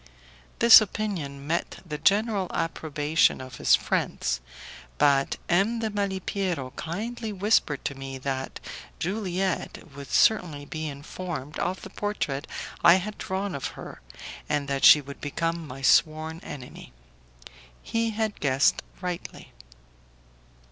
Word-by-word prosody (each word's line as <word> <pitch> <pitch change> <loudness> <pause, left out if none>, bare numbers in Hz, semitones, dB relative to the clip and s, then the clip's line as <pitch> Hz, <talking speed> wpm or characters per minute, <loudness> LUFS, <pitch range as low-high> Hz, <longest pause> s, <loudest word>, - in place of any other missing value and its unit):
This 235 -1 +10
opinion 180 -10 -4
met 165 +3 -2
the 150 -3 -5
general 205 +1 +2
approbation 160 -1 +1
of 130 -1 -9
his - - +5
friends, - - -1 0.6
but 140 -1 +3
M. 195 +7 +2
de 225 -1 -2
Malipiero 190 -7 -2
kindly 220 +7 -4
whispered 195 -8 +1
to - - -1
me 135 0 -7
that 135 0 -4 0.4
Juliette 185 -4 -3
would 140 -1 -9
certainly 160 -9 +2
be 155 +1 -5
informed 150 0 -6
of 185 +2 -2
the 190 - -9
portrait 175 -11 -3 0.4
I 170 0 +9
had 210 +3 -3
drawn 190 0 -3
of 140 - -4
her, - - -9 0.5
and 145 -1 0
that 140 -1 -2
she 150 - +9
would 140 0 -11
become 165 +2 -2
my 135 +1 -9
sworn 155 +3 +3
enemy. 125 - -10 0.9
He 230 0 0
had 220 -1 -2
guessed 140 -1 +3 0.2
rightly. 180 -2 -6
165 Hz, 125 wpm, -26 LUFS, 140-200 Hz, 0.9 s, This